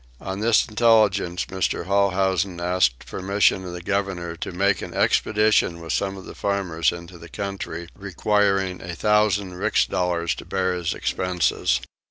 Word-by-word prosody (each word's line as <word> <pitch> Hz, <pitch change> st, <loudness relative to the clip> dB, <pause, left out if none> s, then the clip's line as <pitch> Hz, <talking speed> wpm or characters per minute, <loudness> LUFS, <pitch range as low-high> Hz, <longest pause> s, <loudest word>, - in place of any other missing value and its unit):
On 95 Hz, +1 st, -5 dB
this 115 Hz, +1 st, +3 dB
intelligence 110 Hz, -6 st, +2 dB
Mr. 95 Hz, -2 st, -2 dB
Holhousen 95 Hz, -1 st, +1 dB
asked 85 Hz, -8 st, +1 dB
permission 95 Hz, 0 st, +1 dB
of 90 Hz, -, -6 dB
the 90 Hz, 0 st, -7 dB
governor 95 Hz, -4 st, -2 dB
to -, -, -5 dB
make 95 Hz, +1 st, +1 dB
an -, -, -7 dB
expedition 105 Hz, -5 st, +2 dB
with 80 Hz, -1 st, -4 dB
some 100 Hz, -1 st, -1 dB
of 95 Hz, -, -10 dB
the -, -, -9 dB
farmers 90 Hz, -6 st, 0 dB
into 85 Hz, 0 st, -10 dB
the 85 Hz, -, -12 dB
country, 100 Hz, -2 st, -5 dB
requiring 100 Hz, -1 st, 0 dB
a 85 Hz, -1 st, -6 dB
thousand 105 Hz, -2 st, +2 dB
rix 90 Hz, -, +1 dB
dollars 85 Hz, -2 st, -1 dB
to -, -, -9 dB
bear 95 Hz, -1 st, 0 dB
his 90 Hz, -2 st, -2 dB
expenses. 90 Hz, -6 st, 0 dB
95 Hz, 155 wpm, -23 LUFS, 90-100 Hz, -, this